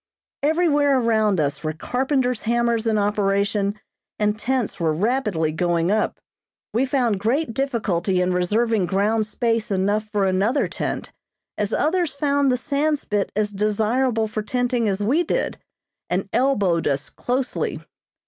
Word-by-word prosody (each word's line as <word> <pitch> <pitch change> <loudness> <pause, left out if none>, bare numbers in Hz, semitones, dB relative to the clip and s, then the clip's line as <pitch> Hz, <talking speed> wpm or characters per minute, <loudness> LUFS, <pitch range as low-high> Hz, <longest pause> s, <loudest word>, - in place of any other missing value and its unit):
Everywhere 295 -3 +3
around 220 -5 +2
us 145 -1 -1
were 155 0 -1
carpenter's 250 - -1
hammers 235 0 +1
in 220 -1 +2
operation, 200 0 0 0.4
and 210 0 +1
tents 240 -2 -2
were 160 -2 +1
rapidly 205 - 0
going 170 +2 0
up. 215 +1 0 0.5
We 255 +4 +1
found 245 -7 +1
great 235 +5 0
difficulty 210 -9 0
in 180 0 +1
reserving 205 +2 +1
ground 210 +3 +1
space 230 0 -1
enough 205 +2 0
for 205 -2 +1
another 195 +9 +1
tent, - - -4 0.4
as 210 0 -2
others 330 0 +1
found 280 -1 +2
the 250 - +1
Sandspit 280 -7 -1
as 210 0 0
desirable 220 +3 +1
for 215 0 -3
tenting 245 0 0
as 195 +1 -1
we 275 +11 +2
did, 345 - -1 0.5
and - - -1
elbowed 200 -11 +2
us 140 0 -1
closely. 255 +1 -2
220 Hz, 140 wpm, -22 LUFS, 200-255 Hz, 0.5 s, Everywhere